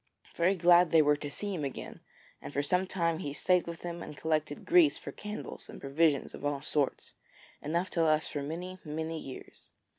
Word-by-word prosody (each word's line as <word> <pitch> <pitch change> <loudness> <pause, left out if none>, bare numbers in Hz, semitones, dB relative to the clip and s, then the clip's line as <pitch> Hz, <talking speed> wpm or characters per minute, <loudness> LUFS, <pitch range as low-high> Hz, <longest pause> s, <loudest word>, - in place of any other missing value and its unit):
Very 180 +3 +3
glad 175 0 +6
they 160 -1 +6
were 150 0 +4
to 145 0 -5
see 205 +8 -3
him 165 -5 -3
again, 135 - -6 0.4
and - - -7
for 145 0 0
some 180 +6 +1
time 170 -3 0
he 140 - -4
stayed 180 +4 +2
with 170 -1 -6
them 170 -1 -5
and 150 - -8
collected 155 -2 -1
grease 340 -3 +5
for - - -7
candles 210 +1 -7
and - - -9
provisions 140 0 +1
of - - -9
all 145 -1 -1
sorts, 145 -2 -1 0.5
enough 170 +5 -1
to 170 - +1
last 155 -1 +3
for 145 - -3
many, 175 +6 -5
many 160 +1 -4
years. 135 -3 -10
160 Hz, 200 wpm, -31 LUFS, 145-180 Hz, 0.5 s, glad